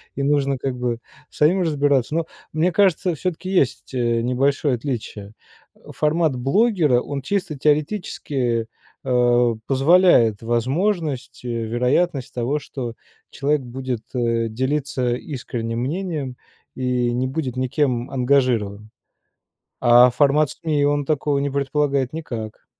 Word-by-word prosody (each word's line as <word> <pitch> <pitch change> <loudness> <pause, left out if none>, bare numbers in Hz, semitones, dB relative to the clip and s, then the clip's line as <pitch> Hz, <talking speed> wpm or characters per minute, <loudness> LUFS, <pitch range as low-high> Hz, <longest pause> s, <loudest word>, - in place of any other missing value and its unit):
и 140 - -2
нужно, 140 -1 +1
как 130 0 -3
бы, 120 -2 -2 0.3
самим 175 +6 +2
разбираться. 145 -4 +1
Но 165 0 0 0.3
мне 165 +4 +2
кажется, 185 -2 +2
всё-таки 185 +3 -4
есть, 140 -7 0
э, 120 -2 +1
небольшое 135 +3 +1
отличие. 110 -5 -5 0.4
Э, - - -19
формат 155 -2 +1
блогера- 150 - +2
он 140 0 -5
чисто 180 -1 -2
теоретически, 145 - 0 0.4
а, 120 -2 +3
позволяет 135 - +4
возможность 130 - -1
и - - -3
вероятность 125 +6 0
того, 125 +5 -1
что 125 -4 -6 0.4
человек 145 0 0
будет, 125 -1 -5
э, 115 -2 +1
делиться 130 0 -1
искренним 120 -4 -5
мнением 145 -2 -3 0.4
и 125 -1 0
не 125 +2 0
будет 130 -2 -3
никем 130 -1 0
ангажирован. 125 -6 +1 0.9
А 120 0 +7
формат 145 +1 +3
СМИ- 150 -3 0
он 145 0 +1
такого 145 -1 0
не 140 0 -1
предполагает 140 -1 0
никак. 115 -9 -6
135 Hz, 120 wpm, -22 LUFS, 120-150 Hz, 0.9 s, А